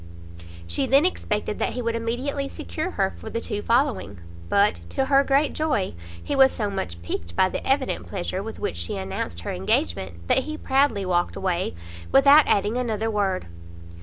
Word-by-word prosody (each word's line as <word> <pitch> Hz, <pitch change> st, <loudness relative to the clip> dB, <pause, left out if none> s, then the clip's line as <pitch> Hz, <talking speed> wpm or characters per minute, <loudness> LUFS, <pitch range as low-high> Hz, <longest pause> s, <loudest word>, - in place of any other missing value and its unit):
She 85 Hz, 0 st, -1 dB
then 275 Hz, +4 st, +5 dB
expected 210 Hz, -, -1 dB
that -, -, 0 dB
he 250 Hz, -, -3 dB
would 230 Hz, 0 st, 0 dB
immediately 260 Hz, +5 st, -2 dB
secure 85 Hz, -1 st, -4 dB
her 95 Hz, -, 0 dB
for 85 Hz, -, -7 dB
the 230 Hz, -, -2 dB
two 210 Hz, -2 st, -3 dB
following; 230 Hz, -, +1 dB, 0.3 s
but, 200 Hz, +1 st, +3 dB
to 270 Hz, -, 0 dB
her 275 Hz, 0 st, +4 dB
great 280 Hz, +2 st, +2 dB
joy, 305 Hz, -12 st, 0 dB, 0.3 s
he 285 Hz, -, -2 dB
was 265 Hz, -1 st, +6 dB
so 210 Hz, -3 st, -2 dB
much 85 Hz, -, -4 dB
piqued 85 Hz, 0 st, -5 dB
by 185 Hz, -, +4 dB
the -, -, -4 dB
evident 270 Hz, 0 st, 0 dB
pleasure 185 Hz, 0 st, -3 dB
with 225 Hz, +2 st, -7 dB
which 85 Hz, -, -3 dB
she 85 Hz, +3 st, -3 dB
announced 95 Hz, -3 st, -4 dB
her -, -, -4 dB
engagement, 85 Hz, -1 st, -1 dB
that 265 Hz, -, +3 dB
he 310 Hz, 0 st, -5 dB
proudly 265 Hz, -9 st, +1 dB
walked 175 Hz, -1 st, 0 dB
away 180 Hz, -, -1 dB, 0.4 s
without 280 Hz, +2 st, +7 dB
adding 210 Hz, +4 st, +2 dB
another 225 Hz, -3 st, -1 dB
word. 195 Hz, -3 st, 0 dB
210 Hz, 180 wpm, -24 LUFS, -, 0.4 s, without